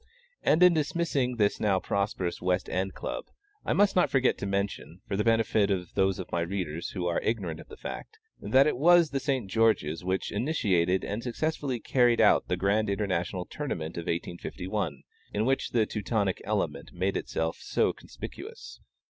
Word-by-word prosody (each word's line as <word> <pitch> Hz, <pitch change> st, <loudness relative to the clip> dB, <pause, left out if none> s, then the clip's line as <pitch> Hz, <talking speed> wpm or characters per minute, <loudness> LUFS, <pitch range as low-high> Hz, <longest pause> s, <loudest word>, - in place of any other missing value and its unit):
And 165 Hz, +4 st, +4 dB
in 180 Hz, -1 st, +8 dB
dismissing 150 Hz, -5 st, 0 dB
this 105 Hz, -3 st, +1 dB
now 100 Hz, -3 st, +2 dB
prosperous 100 Hz, -3 st, -2 dB
West 90 Hz, +1 st, 0 dB
End 95 Hz, +1 st, -2 dB
Club, -, -, -4 dB, 0.4 s
I -, -, 0 dB
must 200 Hz, 0 st, +3 dB
not 180 Hz, -, +4 dB
forget 130 Hz, -2 st, +3 dB
to 100 Hz, -, -3 dB
mention, 100 Hz, -3 st, -3 dB
for 100 Hz, -, -2 dB
the 105 Hz, -, +1 dB
benefit 115 Hz, -2 st, +3 dB
of 90 Hz, -3 st, -2 dB
those 95 Hz, -1 st, +2 dB
of 95 Hz, -, -7 dB
my 85 Hz, -, 0 dB
readers 85 Hz, -2 st, -3 dB
who 90 Hz, -3 st, -4 dB
are 85 Hz, -1 st, 0 dB
ignorant 95 Hz, -8 st, -2 dB
of -, -, -12 dB
the -, -, -11 dB
fact, 445 Hz, -, -7 dB, 0.2 s
that 135 Hz, +1 st, +4 dB
it 150 Hz, -, +1 dB
was 170 Hz, +2 st, +5 dB
the 140 Hz, -, 0 dB
St. 135 Hz, -6 st, -1 dB
George's 95 Hz, -7 st, +1 dB
which 95 Hz, +1 st, -1 dB
initiated 100 Hz, -, +1 dB
and 105 Hz, +3 st, -3 dB
successfully 135 Hz, +1 st, -2 dB
carried 120 Hz, 0 st, +3 dB
out -, -, +5 dB
the -, -, 0 dB
Grand 100 Hz, +2 st, +1 dB
International 90 Hz, -3 st, -1 dB
Tournament 85 Hz, -, -4 dB
of 85 Hz, -, -5 dB
1851, 85 Hz, -1 st, -3 dB, 0.3 s
in 105 Hz, +2 st, +1 dB
which 135 Hz, +2 st, +1 dB
the 115 Hz, -3 st, +2 dB
Teutonic 105 Hz, -2 st, -1 dB
element -, -, -2 dB
made 95 Hz, +2 st, -1 dB
itself 80 Hz, 0 st, -2 dB
so -, -, +1 dB
conspicuous. -, -, -10 dB
100 Hz, 175 wpm, -28 LUFS, 90-125 Hz, 0.4 s, in